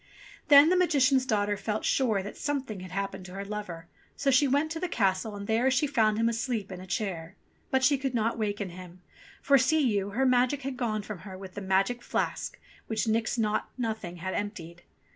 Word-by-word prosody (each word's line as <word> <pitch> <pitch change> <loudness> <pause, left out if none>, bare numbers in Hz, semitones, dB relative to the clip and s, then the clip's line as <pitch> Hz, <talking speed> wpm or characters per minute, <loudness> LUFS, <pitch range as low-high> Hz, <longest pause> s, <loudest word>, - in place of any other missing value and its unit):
Then 290 +2 +8
the 365 - +4
Magician's 280 -7 +3
daughter 205 -2 +1
felt 210 +1 -3
sure 220 -7 +1
that 205 - -7
something 270 -8 -3
had 185 0 -8
happened 195 +1 -4
to 180 - -11
her 195 +1 -5
lover; 195 -5 -6 0.3
so 275 -1 +1
she 270 +2 +4
went 285 +4 +1
to 325 - -3
the 365 - -1
castle, 205 - 0
and 200 0 -6
there 230 +5 +2
she 265 +3 +2
found 220 -7 +2
him 225 - +1
fast 230 0 0
asleep 225 -6 -2
in 185 -1 -7
a 185 - -10
chair. 180 -3 -3 0.3
But 265 0 +1
she 280 +1 +4
could 265 -2 -2
not 230 0 +1
waken 205 -3 -2
him, 180 0 -12 0.4
for, 275 -1 +5
see 305 +6 +3
you, 200 0 -1
her 250 +7 0
magic 255 +2 +2
had 270 0 -3
gone 215 -4 -2
from 205 -2 -7
her 190 0 -9
with 190 -1 -10
the 205 - -6
magic 195 +5 +1
flask - - -3 0.3
which 220 0 -1
Nix 225 +2 0
Naught 215 -2 0
Nothing 220 -7 -3
had 185 +2 -4
emptied. 175 -5 -5
215 Hz, 215 wpm, -28 LUFS, 195-260 Hz, 0.4 s, Then